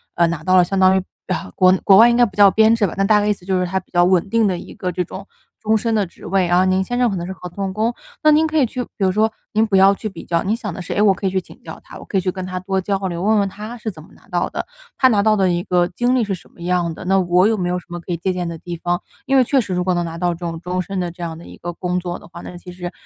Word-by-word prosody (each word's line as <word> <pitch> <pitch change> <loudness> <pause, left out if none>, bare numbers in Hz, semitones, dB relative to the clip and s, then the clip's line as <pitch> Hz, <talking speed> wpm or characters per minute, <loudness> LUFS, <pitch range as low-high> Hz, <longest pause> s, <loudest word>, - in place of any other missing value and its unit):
呃， 170 0 +3
拿 165 -2 -4
到 185 +2 +4
了 180 - +6
相 195 +2 -3
当 190 0 +5
于， - - +1 0.3
啊， - - -3
国 185 0 +5
内 185 - +2
国 195 - +7
外 230 +4 +8
应 235 - +2
该 245 - +6
不 200 -5 -8
叫 200 -1 +7
编 220 +2 +4
制 225 -3 +1
吧， 180 - -3
那 195 - +2
大 210 +1 +4
概 205 - 0
意 - - +4
思 200 -3 -5
就 190 0 0
是 180 - 0
他 190 +2 -1
比 185 - -21
较 175 0 +4
稳 180 +1 +2
定 230 +1 +2
的 185 -3 0
一 - - -11
个 180 - -3
这 180 +1 -2
种 - - -9 0.4
终 220 +1 +2
身 225 +1 -1
的 210 -2 +1
职 170 - -15
位。 190 +1 +1
然 175 +1 +3
后 185 - +3
您 185 0 +2
先 245 +5 -3
生 245 -1 +3
可 200 - -3
能 175 -1 -4
是 190 - -5
合 180 -1 -9
同 195 +2 -4
工， 220 +4 0 0.3
那 305 - +5
您 310 +1 +4
可 315 0 -1
以 285 - +4
去 250 +2 -4
比 - - -14
如 190 - +3
说 215 +3 +2 0.2
您 220 +1 +3
不 210 -3 0
要 195 +1 +6
去 215 - -5
比 195 - -10
较， 170 -1 0
您 210 +3 0
想 225 -4 -5
的 - - -8
是： 175 - -5
“哎， 205 - +1
我 205 -2 +5
可 195 - -7
以 - - +3
去 190 - +1
请 - - -17
教 - - -9
他， - - -12
我 - - -11
可 195 - -2
以 - - -2
去 185 - -1
跟 185 0 -6
他 185 0 -4
多 190 +1 -1
交 195 +1 -1
流， 170 -1 -4
问 215 +1 +3
问 200 -1 0
他 210 +4 -8
是 225 -1 -4
怎 155 -5 -13
么 - - -18
拿 - - -22
到 - - -1
的， - - -5 0.3
他 260 - +5
拿 210 -5 +3
到 215 0 +4
的 190 -3 +2
一 175 0 -1
个 175 -1 +1
经 245 +6 0
历 250 - +2
是 200 -2 -2
什 180 - -17
么 - - -17
样 175 -1 0
的， 180 - -10
那 195 +1 +3
我 180 +1 +3
有 220 0 +1
没 180 -2 -1
有 180 0 -1
什 - - -19
么 175 0 -6
可 175 - -8
以 170 - -1
借 185 +3 -1
鉴 180 -1 -3
的 170 -1 -5
地 175 +1 -7
方。” 175 +1 -2 0.2
因 270 - +1
为 260 - +6
确 270 +3 +2
实 205 -6 -2
如 180 0 0
果 185 0 +1
能 175 0 -1
拿 165 0 -6
到 175 0 +1
这 - - -16
种 170 -2 -4
终 180 +1 -3
身 190 +2 -4
的 175 -1 -2
这 175 +1 -9
样 165 -1 -5
的 170 - -12
一 - - -12
个 175 0 -6
工 180 +1 -2
作 175 -1 -5
的 - - -15
话， 170 0 -11
那 - - -9
其 180 +1 -11
实 175 0 -6
185 Hz, 390 characters per minute, -19 LUFS, 175-210 Hz, 0.4 s, 外